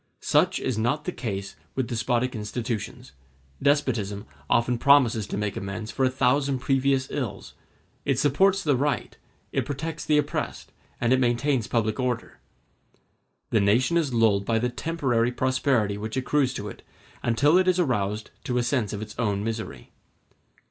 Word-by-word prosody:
Such - - +2
is 125 -4 -2
not 120 +7 0
the 180 - -1
case 100 - -5 0.2
with 130 - 0
despotic 120 +1 -1
institutions: 110 - -4 0.5
despotism 115 -8 +1 0.2
often 120 0 +2
promises 125 -7 +4
to - - -4
make 105 -1 -2
amends 100 +3 -5
for 135 - -1
a 130 - +4
thousand 135 +2 +1
previous 135 +1 +1
ills; 130 -8 -4 0.5
it 135 -3 +1
supports 190 +9 +3
the 145 -3 +3
right, 140 +3 -1 0.4
it - - 0
protects 155 +3 -4
the 150 - +3
oppressed, 145 -1 -2 0.3
and 120 +1 +2
it 130 - +3
maintains 120 0 +1
public 110 -1 0
order. 125 -2 -2 1.1
The 110 - +3
nation 120 +11 +3
is 160 -5 +1
lulled 110 -4 +3
by 115 +2 +1
the 125 +2 0
temporary 125 -4 0
prosperity 130 -5 +1
which 110 +4 -4
accrues 130 0 +1
to 105 - -4
it, - - -9 0.4
until 140 +7 +3
it 185 - +2
is 185 0 +3
roused 110 - -1
to 125 - -1
a 125 - +2
sense 120 -4 0
of 105 0 -4
its 105 - -9
own 105 -4 0
misery. 110 - -5
125 Hz, 160 wpm, -26 LUFS, 110-140 Hz, 1.1 s, promises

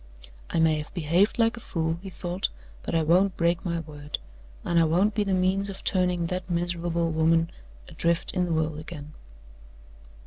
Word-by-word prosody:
"I - - 0
may 160 -1 +3
have 150 - -7
behaved 175 +5 +2
like 230 -1 +3
a - - -8
fool," 165 -5 -2
he 195 - -7
thought, 180 +1 -2 0.3
"but - - -3
I 165 - +3
won't 180 +4 +3
break 170 0 +1
my 170 -2 -1
word; 150 -1 -6 0.5
and 170 - +3
I - - +5
won't 180 +7 +3
be 210 0 +1
the 195 -2 +1
means 190 +2 +1
of 195 - -8
turning 180 -2 +1
that 180 +1 -4
miserable 170 -1 0
woman 165 +1 +2 0.4
adrift 170 0 +1
in 180 -1 +1
the 175 - -3
world 160 -1 0
again." 155 -1 -9
170 Hz, 180 wpm, -26 LUFS, 160-185 Hz, 0.5 s, I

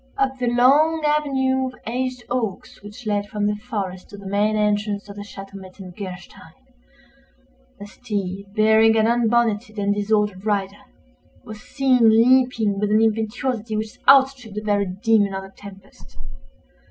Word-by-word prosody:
Up 265 -1 -1
the 245 - -1
long 285 +7 +3
avenue 265 -3 +1
of 255 - -9
aged 255 +1 -3
oaks 235 -6 -4
which 210 +4 -12
led 205 -1 -1
from 210 -1 -2
the 210 - +1
forest 200 -3 -6
to 205 - -11
the 200 - -12
main 205 +2 0
entrance 210 -1 -1
of 200 - -10
the 205 - -8
Château 195 -1 -11
Metzengerstein, 185 -1 -10 1.3
a 205 - -8
steed, 200 -3 -5
bearing 220 +1 +4
an 220 - +3
unbonneted 230 -2 +1
and 205 0 0
disordered 205 -2 -1
rider, 200 -2 -2 0.6
was 215 0 -10
seen 255 -4 +2
leaping 230 -3 +3
with 210 0 0
an 215 +1 +3
impetuosity 225 +1 -1
which 215 0 -6
outstripped 265 -5 +4
the 210 - -3
very 205 -2 0
Demon 205 +1 +1
of 190 - -5
the 195 - -12
Tempest. 195 - -15
215 Hz, 150 wpm, -21 LUFS, 200-245 Hz, 1.3 s, bearing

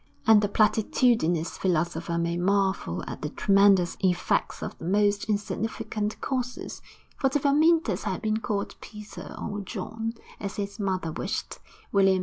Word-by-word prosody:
And 220 -2 +7
the 205 - +1
platitudinous 210 -5 +2
philosopher 170 -1 0
may 170 0 0
marvel 190 - 0
at - - -7
the 150 - -2
tremendous 195 -1 +4
effects 180 -2 0
of - - -5
the - - -7
most 205 +2 +2
insignificant 215 0 -2
causes, 250 -2 -3 0.4
for 270 - +3
if 280 +2 -1
Amyntas 295 - +3
had 190 -3 -1
been 215 0 +1
called 210 -3 -3
Peter 210 -1 -9
or 205 - -4
John, 225 +3 -5 0.2
as 200 -1 -5
his 200 +1 -4
mother 185 -5 -1
wished, - - -4 0.3
William 195 -1 +5
II. - - -1
205 Hz, 145 wpm, -27 LUFS, 185-220 Hz, 0.4 s, And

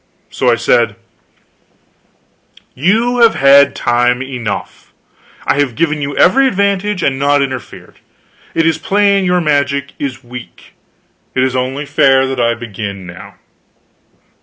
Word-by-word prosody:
So - - 0
I - - +4
said: - - +1 1.8
"You 225 - +1
have 230 -1 +5
had 140 0 +5
time 125 +1 +1
enough. 125 -6 -6 0.5
I 145 - +1
have 135 -5 0
given 155 -2 -1
you 140 0 -4
every 270 +9 +4
advantage, 200 -3 -1
and 135 -1 0
not 145 0 +2
interfered. 130 -2 -8 0.6
It 165 - +2
is 165 -1 +1
plain 200 -1 +1
your 180 0 +1
magic 140 -2 -1
is 135 -2 -5
weak. 120 0 -12 0.6
It 130 - +2
is 130 -1 -1
only 130 +3 -2
fair 135 -2 +3
that 130 -1 -4
I 120 0 +1
begin 100 -4 -7
now." 90 0 -11
140 Hz, 135 wpm, -14 LUFS, 125-175 Hz, 1.8 s, have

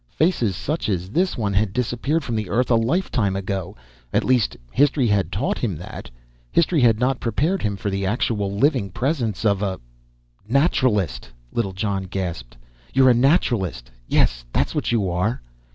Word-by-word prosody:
Faces 140 - +1
such 150 - -2
as 90 -1 -2
this 180 - +1
one 105 -4 -1
had 100 0 +1
disappeared 125 +7 -1
from 120 -4 -3
the 105 -4 -2
earth 125 +6 +1
a - - +6
lifetime 115 - +1
ago. 95 -4 -4 0.3
At - - +2
least, 125 -4 +2
history 140 0 +3
had 105 -3 +1
taught - - -1
him - - -1
that. - - -9 0.4
History 165 -2 +3
had 115 -3 +5
not 125 +1 +1
prepared 150 - 0
him 100 -2 -1
for 100 - -3
the 100 0 -2
actual 105 -1 0
living 120 -1 +1
presence 120 - -2
of 100 -2 +2
a 95 -2 -2 0.7
"Naturalist!" 115 - +1 0.2
Littlejohn 95 -2 -1
gasped. 85 -11 -5 0.4
"You're 130 -1 +6
a - - +5
Naturalist! 120 - +1 0.2
Yes, - - +2
that's - - 0
what - - -1
you 110 -5 +1
are!" 90 +7 0
110 Hz, 165 wpm, -22 LUFS, 95-130 Hz, 0.7 s, a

